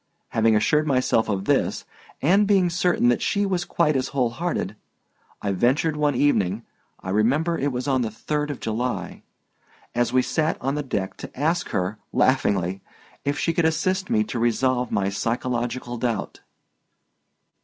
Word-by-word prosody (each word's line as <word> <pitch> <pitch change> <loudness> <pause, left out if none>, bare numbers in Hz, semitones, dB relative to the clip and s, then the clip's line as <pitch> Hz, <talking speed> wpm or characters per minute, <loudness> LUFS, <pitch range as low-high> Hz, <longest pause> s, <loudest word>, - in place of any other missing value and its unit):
Having 110 0 +3
assured 150 +8 +2
myself 130 -5 +2
of 100 -2 -1
this - - +1 0.4
and 195 +7 +4
being 190 -4 +3
certain 175 -7 +2
that 120 - +1
she 200 0 +1
was 180 -3 -1
quite 155 -3 +1
as 130 - 0
whole 130 -5 0
hearted, 160 - -3 0.7
I 100 - 0
ventured 130 - +2
one 150 -2 +1
evening 115 -7 +1 0.4
(I 95 - -4
remember 140 - +2
it 145 -2 -1
was 125 +2 -3
on 130 -2 +2
the 115 - -1
3d 150 +7 -3
of 145 - -4
July) 120 +3 -3 0.7
as 120 0 +1
we 130 0 +3
sat 160 +4 0
on 135 +2 -1
deck 95 -6 -3
to - - -10
ask 165 +4 0
her, 95 +4 -2
laughingly, 95 -8 +1 0.4
if 140 +1 0
she 165 - 0
could 170 0 +1
assist 185 +5 0
me 220 -2 +3
to 145 - -4
resolve 125 +1 +1
my 100 -1 +1
psychological 120 +3 -2
doubt. 115 -4 -2
130 Hz, 160 wpm, -24 LUFS, 115-155 Hz, 0.7 s, and